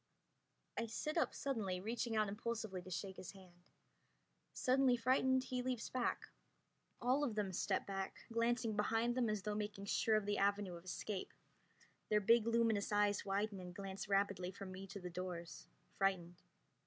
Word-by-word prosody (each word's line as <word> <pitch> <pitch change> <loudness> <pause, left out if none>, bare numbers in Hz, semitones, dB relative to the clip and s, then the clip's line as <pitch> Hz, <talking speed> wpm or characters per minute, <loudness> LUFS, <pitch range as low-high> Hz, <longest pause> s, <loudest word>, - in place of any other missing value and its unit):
I 230 - -1
sit 300 +7 -3
up 330 - +2
suddenly, 215 -10 -2
reaching 230 +3 -2
out 215 -1 +3
impulsively 210 -2 -3
to 185 - -10
shake 190 +1 -4
his 185 - -7
hand. 180 -2 -17 0.8
Suddenly 255 -1 +3
frightened 260 +2 +3
he 255 -1 -2
leaps 250 -2 -2
back. 250 -2 -1 0.7
All 255 +4 +2
of 240 -7 0
them 200 -3 -1
step - - 0
back, 195 -1 -4
glancing 230 -1 +1
behind 225 +3 +2
them 240 -2 +1
as 210 -2 -1
though 210 - -1
making 210 -1 -3
sure 220 +2 +3
of 215 -2 +2
the 205 0 0
avenue 200 -1 +2
of 170 +1 -9
escape. 190 +1 -4 0.8
Their 210 - +5
big 230 +2 +5
luminous 230 -3 +2
eyes 205 0 +3
widen 200 +1 0
and 180 -1 -8
glance 195 0 -5
rapidly 195 -2 +2
from 190 0 -7
me 190 +1 -7
to 195 +1 -7
the 180 -1 -6
doors, 175 -1 -5 0.3
frightened. 180 -3 +1
205 Hz, 165 wpm, -39 LUFS, 190-230 Hz, 0.8 s, Their